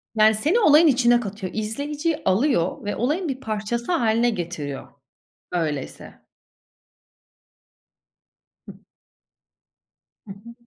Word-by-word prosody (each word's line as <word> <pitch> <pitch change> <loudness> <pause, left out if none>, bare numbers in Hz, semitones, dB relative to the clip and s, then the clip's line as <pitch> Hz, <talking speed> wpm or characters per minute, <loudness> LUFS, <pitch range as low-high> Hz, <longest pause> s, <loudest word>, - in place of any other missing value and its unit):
Yani, 215 0 +5
seni 315 - +1
olayın 315 -4 +6
içine 240 -3 +4
katıyor. 200 -4 -6
İzleyiciyi 290 +9 -3
alıyor 190 - +1
ve 205 - -2
olayın 310 +9 -1
bir 260 -1 -4
parçası 225 - -3
hâline 235 -6 +2
getiriyor, 165 - -5 0.7
öyleyse. 155 -6 -4 2.5
Hıh. - - -11 1.5
Hı 195 - -10
hı. 220 +4 -12
225 Hz, 95 wpm, -23 LUFS, 200-285 Hz, 2.5 s, olayın